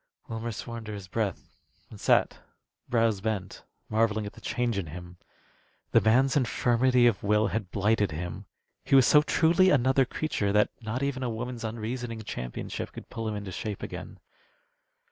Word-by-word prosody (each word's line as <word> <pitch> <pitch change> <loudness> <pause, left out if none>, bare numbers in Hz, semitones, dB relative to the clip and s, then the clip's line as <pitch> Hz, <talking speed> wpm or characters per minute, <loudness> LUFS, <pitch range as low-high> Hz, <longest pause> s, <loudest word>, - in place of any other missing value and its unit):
Wilmer 115 +1 -4
swore 115 +2 -6
under 110 -2 -6
his 100 -2 -8
breath, 105 -2 -3 0.4
and - - -11
sat, - - +2 0.5
brows 115 -4 +2
bent, 100 -3 -3 0.2
marvelling 110 -1 +1
at 100 - -7
the - - -15
change 120 -2 -1
in 100 -4 -2
him. 90 +2 -9 0.7
The - - +5
man's 130 +5 +3
infirmity 125 -1 +3
of 115 -5 +3
will 105 0 +2
had 100 -1 -3
blighted 105 +1 +1
him. 85 +3 -5 0.4
He - - +3
was 135 -2 +7
so 150 - +7
truly 170 +4 +4
another 130 -2 +4
creature 120 -7 -1
that 105 0 +3
not 115 +4 -3
even 140 -2 -1
a 125 - -1
woman's 120 +1 -5
unreasoning 115 +1 -4
championship 60 - -5
could - - -10
pull 115 -1 -4
him 110 - -2
into 100 -2 -5
shape 105 +2 -5
again. - - -7
110 Hz, 165 wpm, -28 LUFS, 105-125 Hz, 0.7 s, was